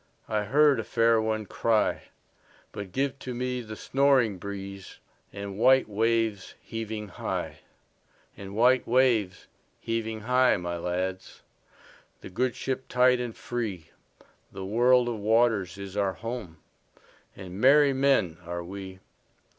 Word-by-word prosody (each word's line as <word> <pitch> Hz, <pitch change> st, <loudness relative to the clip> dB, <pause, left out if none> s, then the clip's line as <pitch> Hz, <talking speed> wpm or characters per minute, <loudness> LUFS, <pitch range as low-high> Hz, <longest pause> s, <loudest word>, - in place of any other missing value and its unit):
I 105 Hz, -1 st, -1 dB
heard 145 Hz, +5 st, +4 dB
a -, -, -2 dB
fair 115 Hz, -1 st, +2 dB
one 110 Hz, -1 st, -2 dB
cry:But 105 Hz, -2 st, -3 dB
give 135 Hz, +3 st, -1 dB
to 125 Hz, -1 st, -6 dB
me 125 Hz, 0 st, -2 dB
the 110 Hz, -2 st, -8 dB
snoring 130 Hz, -7 st, +2 dB
breezeAnd 100 Hz, 0 st, -9 dB
white 130 Hz, +6 st, +4 dB
waves 110 Hz, -1 st, 0 dB
heaving 110 Hz, -2 st, -6 dB
high; -, -, -4 dB, 0.8 s
And 100 Hz, 0 st, -9 dB
white 125 Hz, +3 st, +3 dB
waves 115 Hz, -6 st, +2 dB, 0.3 s
heaving 110 Hz, -1 st, -3 dB
high, 125 Hz, +3 st, +3 dB
my 85 Hz, -1 st, -4 dB
lads, 90 Hz, +2 st, -4 dB, 0.8 s
The -, -, -10 dB
good 125 Hz, +5 st, -1 dB
ship 130 Hz, 0 st, -4 dB
tight 125 Hz, 0 st, +3 dB
and 120 Hz, -2 st, -5 dB
free—The 100 Hz, -3 st, -8 dB
world 120 Hz, +4 st, +3 dB
of 115 Hz, -3 st, -3 dB
waters 110 Hz, -4 st, +2 dB
is 100 Hz, -1 st, -8 dB
our 100 Hz, -2 st, 0 dB
home, 115 Hz, -4 st, -6 dB, 0.8 s
And 95 Hz, +1 st, -8 dB
merry 140 Hz, +1 st, +6 dB
men 130 Hz, -11 st, +2 dB
are 85 Hz, 0 st, -5 dB
we. 95 Hz, +1 st, -9 dB
110 Hz, 125 wpm, -27 LUFS, 95-125 Hz, 0.8 s, merry